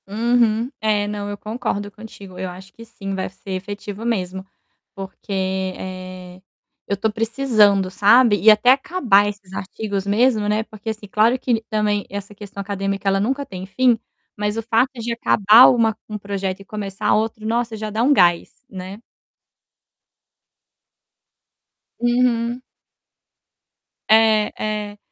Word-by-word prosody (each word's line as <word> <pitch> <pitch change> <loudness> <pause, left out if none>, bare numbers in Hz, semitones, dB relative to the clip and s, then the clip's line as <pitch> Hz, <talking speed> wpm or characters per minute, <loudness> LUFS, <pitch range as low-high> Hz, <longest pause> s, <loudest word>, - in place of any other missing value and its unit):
Uhum. 230 +2 +1
É, 210 -1 +1
não, 205 -1 -4
eu 205 - -5
concordo 215 -2 -4
contigo, 200 -3 -12
eu 185 - -3
acho 190 +2 -12
que 230 - -13
sim, 200 -3 -7
vai 190 -1 -3
ser 195 +1 -11
efetivo 205 +2 -6
mesmo, 190 -4 -2 0.5
porque, 195 +1 -9 0.5
eh, 185 -1 -9 0.5
eu 200 - -1
tô 220 +3 0
precisando 215 -4 +2
sabe, 210 +2 +4
e 220 - +7
até 215 +4 +6
acabar 260 - +3
esses 200 -2 -11
artigos 200 0 -4
mesmo, 215 0 +2
né, 215 +1 +1
porque 220 0 -9
assim 215 -1 -6
claro 225 +5 +3
que 235 -3 0
também 210 -1 0
essa 200 +1 -7
questão 200 -1 -11
acadêmica 195 0 -3
ela 195 0 +2
nunca 265 +7 -1
tem 185 -4 -8
fim, 245 +4 +2 0.4
mas 210 +1 -2
o 225 - -2
fato 235 +3 +2
de 235 0 -3
acabar 225 +1 +6
uma 225 -3 +2
um 215 - -4
projeto 195 -1 -4
e - - -14
começar 200 -1 -2
outro, 220 0 -1
nossa, 230 0 -1
já 215 0 -5
dá 220 +2 -1
um 265 +5 +3
gás, 175 -1 +2
né. 190 +1 -8 3.0
Uhum. 240 0 +1 1.5
É, 220 -1 +4 0.4
é. 205 - -16
210 Hz, 140 wpm, -20 LUFS, 195-230 Hz, 3.0 s, e